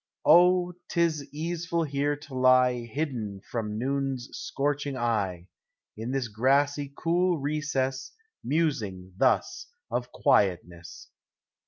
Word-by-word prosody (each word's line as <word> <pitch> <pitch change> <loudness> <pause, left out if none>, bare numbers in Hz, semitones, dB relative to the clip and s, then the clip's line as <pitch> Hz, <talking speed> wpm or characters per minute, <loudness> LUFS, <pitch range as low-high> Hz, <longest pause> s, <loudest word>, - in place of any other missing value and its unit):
Oh, 180 0 +5 0.2
't - - -2
is 155 -4 +1
easeful 165 +2 -2
here 145 0 0
to 145 -1 -13
lie 130 -1 +4
Hidden 115 -8 -4
from 105 -2 -4
noon's 135 0 -2
scorching 140 -1 -2
eye, 100 -8 -1 0.5
In 110 +3 -5
this 130 -2 -1
grassy 140 +5 +1
cool 175 +1 +1
recess 135 -3 -2 0.3
Musing 105 - -1
thus - - +1 0.2
of 120 +1 -2
quietness. 90 -3 0
135 Hz, 110 wpm, -27 LUFS, 115-150 Hz, 0.5 s, Oh